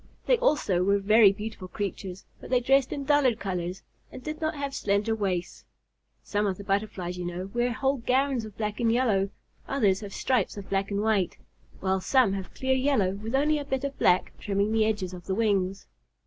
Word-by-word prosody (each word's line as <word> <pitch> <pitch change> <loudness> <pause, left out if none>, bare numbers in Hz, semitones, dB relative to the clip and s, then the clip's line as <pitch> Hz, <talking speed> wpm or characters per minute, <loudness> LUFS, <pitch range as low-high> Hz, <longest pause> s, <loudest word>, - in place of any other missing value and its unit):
They - - +3
also 235 - +2
were 200 +2 +3
very 210 +1 +6
beautiful 210 -2 -7
creatures, 190 -1 -5
but - - -11
they 250 - +3
dressed 270 +2 +3
in 280 - -3
duller 285 -4 +4
colors 185 -3 -4 0.3
and 255 - -10
did 305 +3 -5
not 315 0 -1
have 280 -1 -4
slender 205 -2 0
waists. 190 -5 -2 0.6
Some 205 0 0
of 190 -2 -2
the 200 - -8
Butterflies, 195 -3 -2
you 175 - -3
know, 180 +2 -5
wear 240 +1 +1
whole 270 +4 0
gowns 260 0 +1
of 215 -2 -10
black 210 -1 -3
and 230 -1 +2
yellow, 220 -5 +2 0.4
others 205 -9 +2
have 205 -2 -8
stripes 235 -2 0
of 200 -1 -9
black 195 0 0
and 200 0 -1
white, 210 -5 +1 0.4
while 190 0 +1
some 250 -2 +3
have 195 -1 -6
clear 265 0 +1
yellow 260 -8 +2
with 215 +5 -4
only 300 +2 +2
a - - -4
bit 265 0 -2
of 280 0 -4
black 180 +1 +3
trimming 200 0 0
the 220 -1 +3
edges 205 -4 -1
of 175 -1 -10
the 190 - 0
wings. 195 -3 0
210 Hz, 205 wpm, -27 LUFS, 195-260 Hz, 0.6 s, very